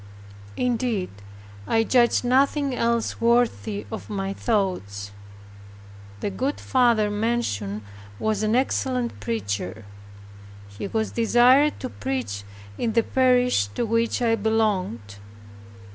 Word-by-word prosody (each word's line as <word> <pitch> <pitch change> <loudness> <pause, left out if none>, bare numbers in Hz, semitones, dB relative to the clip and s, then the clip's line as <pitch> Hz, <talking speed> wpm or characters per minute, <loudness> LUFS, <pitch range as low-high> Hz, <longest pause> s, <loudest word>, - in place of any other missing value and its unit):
Indeed, 240 -5 -1 0.6
I 225 0 +3
judged 240 +1 +3
nothing 275 +2 +2
else 235 -2 0
worthy 230 -3 +1
of 220 - -7
my 195 -2 -3
thoughts. 180 - -2 1.1
The 205 - -2
good 265 +9 -2
father 235 -5 +2
mentioned 205 - -2 0.3
was 215 - -1
an 215 +1 +1
excellent 255 - 0
preacher. 100 -1 -3 0.8
He 100 - -6
was 220 +1 -2
desired 245 +5 +4
to 255 - -4
preach 255 - -4 0.4
in 225 -2 0
the 230 0 +3
parish 250 - +3
to - - +1
which 230 +2 0
I 230 -1 +3
belonged. 200 - -1
225 Hz, 110 wpm, -24 LUFS, 190-245 Hz, 1.1 s, desired